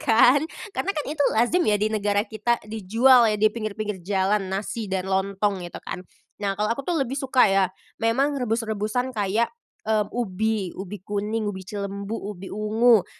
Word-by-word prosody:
kan, 250 0 +5 0.3
karena 390 - -1
kan 300 - -1
itu 300 +1 -5 0.2
lazim 240 +11 +3
ya 210 - +4
di 215 +1 0
negara 205 -1 +1
kita 230 +2 0
dijual 225 +4 +4
ya 215 - +1
di 215 +1 +3
pinggir-pinggir 215 -3 -4
jalan 195 +2 0
nasi 205 +3 -3
dan 190 -1 -1
lontong 195 +1 0
gitu 175 -1 -7
kan. - - -5 0.4
Nah, 195 -1 -1
kalau 210 +2 +1
aku 235 - -4
tuh 340 +5 -1
lebih 255 - -6
suka 265 -2 +3
ya 195 -1 +4 0.4
memang 270 +5 +1
rebus-rebusan 225 +1 -1
kayak, 215 +2 0 0.3
mmm, 215 -1 +1
ubi, 215 -3 -1
ubi 195 +2 -6
kuning, 210 +2 -2
ubi 205 -2 -3
cilembu, 200 +2 -5
ubi 195 -2 -6
ungu, 215 +1 +3
215 Hz, 170 wpm, -24 LUFS, 200-235 Hz, 0.4 s, kan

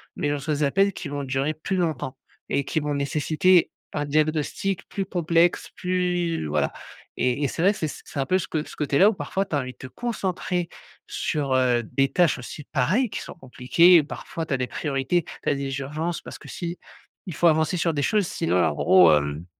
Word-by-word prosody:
mais - - -1
je - - +1
reçois 145 +2 -2
des 145 - -1
appels 195 +8 +2
qui 175 - -6
vont 145 0 -3
durer 135 +3 -1
plus 185 +5 -3
longtemps 155 -7 -2 0.3
et 140 - +1
qui 155 - -1
vont 150 -1 -2
nécessiter 155 +5 +2 0.2
un 145 -1 -1
diagnostic 155 +5 -1
plus 195 - -3
complexe, 175 -1 +1
plus 180 - -1
voilà 75 0 0 0.5
et 125 +3 0
et - - +3
c'est 160 - -4
vrai 190 +3 +5
que 205 - -6
c'est 155 - -1
c'est 145 - -8
un 135 - +1
peu 185 - +2
ce 190 - -3 0.2
ce - - -11
côté 145 -2 0
là 200 +6 +7
où - - 0
parfois 195 0 -2
tu 160 - -3
as - - +2
envie 130 -1 -4
de - - -23
te 130 - -8
concentrer 185 - -2 0.4
sur, 140 -3 -2
heu, 125 -2 +3
des 135 +4 0
tâches 175 -4 +3
aussi, 140 +4 -8
pareil, 185 - +2
qui - - -5
sont - - -9
compliquées. 165 +4 +4
Parfois 165 +2 -6
tu 150 - -3
as - - +1
des 125 -1 -2
priorités, 145 +5 -1 0.2
tu - - 0
as 145 - +2
des 140 0 -3
urgences 155 +5 -3
parce - - -9
que - - -13
s'il 170 -1 -4 0.6
faut 170 - +3
avancer 160 +2 +2
sur 165 -1 +1
des 145 - -1
choses 205 +4 +1
sinon 160 - 0
en - - +2
gros, 90 -4 +6
hem 75 +2 -2
155 Hz, 215 wpm, -24 LUFS, 135-175 Hz, 0.6 s, là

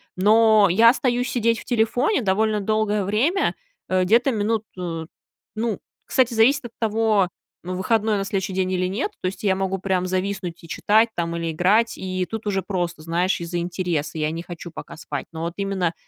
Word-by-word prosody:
Но 215 +2 +5
я 225 +6 +7
остаюсь 245 -1 +1
сидеть 230 -1 +1
в - - -12
телефоне 245 - +1
довольно 210 +1 +1
долгое 210 0 0
время, 255 - +1 0.4
э, 185 0 +2
где-то 235 +8 +3
минут 220 0 0 0.9
Ну, 220 -2 -2 0.3
кстати, 255 -2 +2
зависит 240 +4 +3
от 235 - -7
того, 220 -4 +2 0.3
ну, 185 +1 -4
выходной 215 +3 +1
на 195 - -1
следующий 195 -1 -2
день 185 0 0
или 185 0 0
нет. 225 - -2
То - - -5
есть 190 - -6
я 195 -2 +3
могу 190 0 -2
прям 185 -1 0
зависнуть 185 -2 -3
и - - -11
читать 220 +7 +3
там 170 -1 -2
или 165 -1 -2
играть, 205 +8 +2
и 185 -1 -2
тут 225 -1 -5
уже 195 -2 0
просто, 175 -3 -3
знаешь, 170 +4 0
из-за 170 +1 -3
интереса, 170 -3 -2
я 155 0 0
не 165 +1 -5
хочу 175 0 -8
пока - - -9
спать. 160 - -5
Но 160 - -7
вот 170 +1 -3
именно, 195 -4 -1
195 Hz, 185 wpm, -23 LUFS, 180-225 Hz, 0.9 s, я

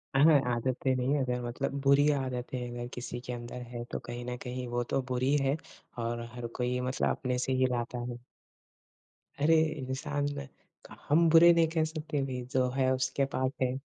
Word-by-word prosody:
अह 145 +4 +7 0.3
आदतें 130 +2 0
नहीं 130 +3 +1
अगर 125 -2 -1
मतलब 130 +3 -3
बुरी 140 +1 +5
आदतें 130 -2 -2
अगर 120 0 -5
किसी 125 0 -5
के 125 - -4
अंदर 120 +1 -6
हैं 120 -1 -5
तो - - -2
कहीं 120 0 -6
न 125 0 -3
कहीं 125 0 -4
वो 120 - +1
तो 135 - +3
बुरी 130 +3 +2
है 135 +1 +2 0.5
और 120 0 -2
हर 120 -1 -4
कोई 125 0 0
मतलब 130 +1 0
अपने 125 -1 -1
से 130 +1 0
ही 130 0 +3
लाता 120 0 -2
है। 120 - -6 1.2
अरे! 160 +3 +5 0.2
इंसान 135 +2 -2 0.8
हम 165 +3 +5
बुरे 170 +1 +8
नहीं 165 -1 +4
कह 160 -1 +1
सकते 155 -2 -3
भई, 130 -2 -4
जो 130 -1 +2
है 130 0 +1
उसके 130 +1 0
पास 130 0 +1
है। 130 0 +1
130 Hz, 180 wpm, -30 LUFS, 125-140 Hz, 1.2 s, बुरे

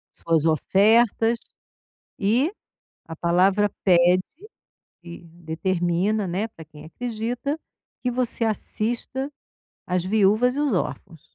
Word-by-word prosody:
Suas 165 -2 0
ofertas, 225 +7 +3 0.8
e 235 - +2 0.6
a 165 - -7
palavra 185 +5 +2
pede, 180 0 +4 0.8
e 170 0 -11
determina, 175 +4 -1
né, 195 +6 -2
para 165 -6 -13
quem 150 0 -14
acredita, 240 - -4 0.4
que 250 - 0
você 245 -1 +1
assista 235 +5 -2 0.6
as 180 -1 0
viúvas 215 +5 +3
e 290 - -2
os 290 -6 +1
órfãos. 170 -2 -4
195 Hz, 105 wpm, -23 LUFS, 170-230 Hz, 0.8 s, pede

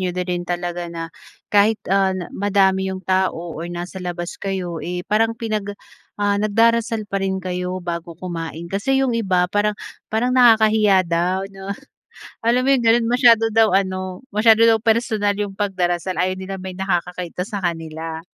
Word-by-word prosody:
niyo 185 -1 -1
na 180 - -1
rin 175 -1 -2
talaga 175 0 -3
na 165 -1 -7 0.4
kahit, 210 +2 +4 0.2
ah, 195 -1 +3 0.2
madami 190 -1 +2
yung 190 0 -6
tao 185 -2 0
or 165 +2 -6
nasa 175 +2 -6
labas 175 -1 -5
kayo, 185 -4 -3
eh, 180 0 -4
parang 225 +3 +1
pinag 215 -3 -3 0.4
ah, 205 0 +1
nagdarasal 225 +1 +2
pa 200 -1 -3
rin 190 0 -1
kayo 180 0 -3
bago 170 -2 -5
kumain. 170 -2 -6
Kasi 270 +7 +1
yung 250 - 0
iba 190 -6 +1
parang 210 0 +1 0.3
parang 240 +3 0
nakakahiya 220 -5 +5
daw 175 +3 0
'no. 195 0 -10 0.7
Alam 240 +2 +2
mo 270 - +1
yung 245 -4 +2
gano'n, 235 +1 +4
masyado 230 -3 +5
daw 225 0 +5
ano, 185 +1 -2
masyado 220 +1 +5
daw 225 -1 +5
personal 220 -2 +1
yung 205 -1 -3
pagdarasal. 185 -2 -1
Ayaw 185 +1 -1
nilang 190 0 -6
may 190 - -5
nakakakita 180 -1 -3
sa 205 0 -5
kanila. 165 -2 -4
190 Hz, 165 wpm, -21 LUFS, 180-220 Hz, 0.7 s, nakakahiya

